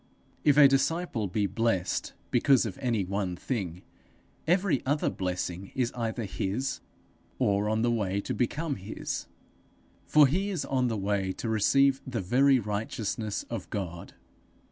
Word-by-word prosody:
If 145 -2 +4
a 145 -2 +10
disciple 135 - 0
be 100 +3 0
blessed 100 -2 -1 0.2
because 130 +1 +4
of 105 - -5
any 115 -7 0
one 95 -1 -2
thing, 90 -4 -4 0.6
every 180 -5 +2
other 145 +3 +1
blessing 90 0 -3
is 125 -2 0
either 115 0 -3
his, 105 +6 -2 0.6
or 100 +1 +1
on 110 +1 +1
the 120 - +3
way 100 -4 0
to - - -3
become 145 +4 -1
his; 95 +3 -5 0.8
for 150 -1 +7
he 185 +9 0
is 185 -6 -2
on 130 -2 +1
the 115 -2 -1
way 100 -1 0
to 115 - -5
receive 135 +5 +3
the 125 -3 -2
very 130 +8 +4
righteousness 105 0 -3
of - - -6
God. 85 -4 -5
115 Hz, 145 wpm, -28 LUFS, 100-135 Hz, 0.8 s, a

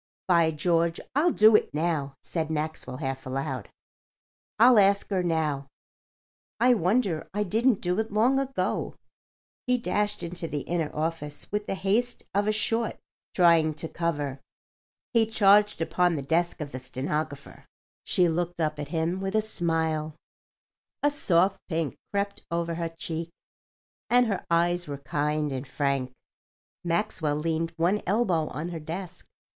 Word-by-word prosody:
"By 170 -3 +4
George, 165 +1 +1
I'll 310 +6 +3
do 215 -3 +6
it - - +2
now," 150 -4 -1
said 160 -2 -2
Maxwell, 155 -4 -3
half 135 -2 -4
aloud. 130 -3 -3 0.9
"I'll 235 +1 +7
ask 200 0 +4
her 190 -2 +2
now. 155 -5 -1 0.9
I 250 +2 +5
wonder 190 -4 +1
I 210 - +1
didn't 225 +3 +2
do 180 +3 0
it 220 -1 -2
long 240 +6 +3
ago." 270 0 -2 0.7
He 250 0 +3
dashed 210 -1 -1
into 170 0 -3
the 145 -2 -3
inner 165 -1 -1
office 155 -1 -3
with 210 0 -2
the - - -1
haste 205 +6 0
of 205 +2 +1
a - - +4
short 225 +2 0 0.4
trying 165 -3 +4
to 160 +2 -4
cover. 145 -5 -2 0.7
He 225 -2 +4
charged 210 -4 +4
upon 170 +2 +2
the 140 - -3
desk 170 +4 0
of 145 -2 -5
the 130 - -5
stenographer. 140 +3 -4 0.4
She 180 - +3
looked 170 +1 -2
up 155 -2 -1
at 145 - -4
him 165 +4 -1
with 195 +2 -2
a - - +5
smile. 160 -6 -1 0.9
A 290 - +4
soft 190 - +2
pink 165 -3 -1 0.2
crept 200 0 -2
over 170 0 -1
her 165 0 -2
cheek, 165 0 -5 0.8
and 245 +1 +5
her 200 -5 -2
eyes 175 +1 +2
were 140 -1 -4
kind 150 +1 -1
and 130 0 -4
frank. 135 -1 -1 0.7
Maxwell 165 -3 0
leaned 165 +2 -1
one 180 +6 +2
elbow 185 -6 +2
on 160 +4 -5
her 170 -2 -5
desk. 175 +3 -7
170 Hz, 150 wpm, -27 LUFS, 155-200 Hz, 0.9 s, I'll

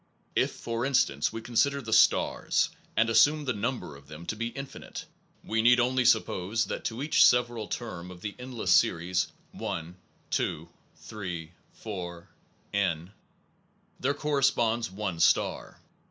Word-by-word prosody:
If, - - +2
for 115 0 -4
instance, 125 - +2
we 115 0 -6
consider 140 +4 +2
the 115 -4 -4
stars, - - +3 0.3
and 115 - +4
assume 145 +6 +4
the 130 - 0
number 115 - -3
of 70 0 -16
them 80 +3 -10
to 105 - -3
be 115 +2 -2
infinite, 135 +3 -8 0.4
we 110 0 0
need 120 +2 +6
only 125 +1 +2
suppose 110 -1 +2
that - - -5
to 120 +4 -3
each 150 - +5
several 120 -3 +3
term 90 -7 -5
of 90 -1 -11
the 105 +1 -4
endless 125 -2 -3
series 90 +2 +3 0.2
1, 85 +2 -5 0.4
2, - - -1 0.3
3, 90 -6 -7 0.2
4,... 90 -5 -7 0.5
n..., 95 -3 0 0.9
there 140 +3 0
cor 150 -1 -1
responds 120 -4 +2
one 95 -3 -4
star. - - +1
110 Hz, 145 wpm, -28 LUFS, 90-125 Hz, 0.9 s, need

